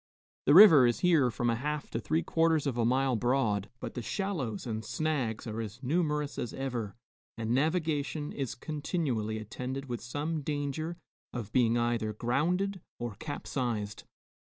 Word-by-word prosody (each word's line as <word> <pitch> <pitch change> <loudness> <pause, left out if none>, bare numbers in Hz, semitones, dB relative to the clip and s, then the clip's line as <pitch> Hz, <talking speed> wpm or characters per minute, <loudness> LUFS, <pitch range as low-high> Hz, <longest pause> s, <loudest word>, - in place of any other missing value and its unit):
The 145 - +7
river 165 - +10
is 120 - 0
here 165 -8 +4
from 120 0 0
a - - +1
half 150 +4 -3
to - - -1
three 160 +2 0
quarters 160 -2 +2
of 135 -4 -1
a 120 - +1
mile 130 +2 +2
broad, 110 -4 +1
but - - -6
the 125 - -4
shallows 140 - -3
and 110 -2 -3
snags 130 -4 -1
are 115 0 -3
as 110 +4 -8
numerous 150 0 0
as 120 - -4
ever 120 -6 -3 0.4
and 115 0 -2
navigation 150 +1 0
is 135 -3 -3
continually 135 - -2
attended 125 +5 -5
with 120 -3 -4
some 150 +6 -3
danger 145 +3 -3 0.4
of 110 -4 -5
being 120 -1 +3
either 120 -2 0
grounded 175 - 0 0.2
or 120 -2 -4
capsized. 120 -8 -3
130 Hz, 160 wpm, -30 LUFS, 115-155 Hz, 0.4 s, river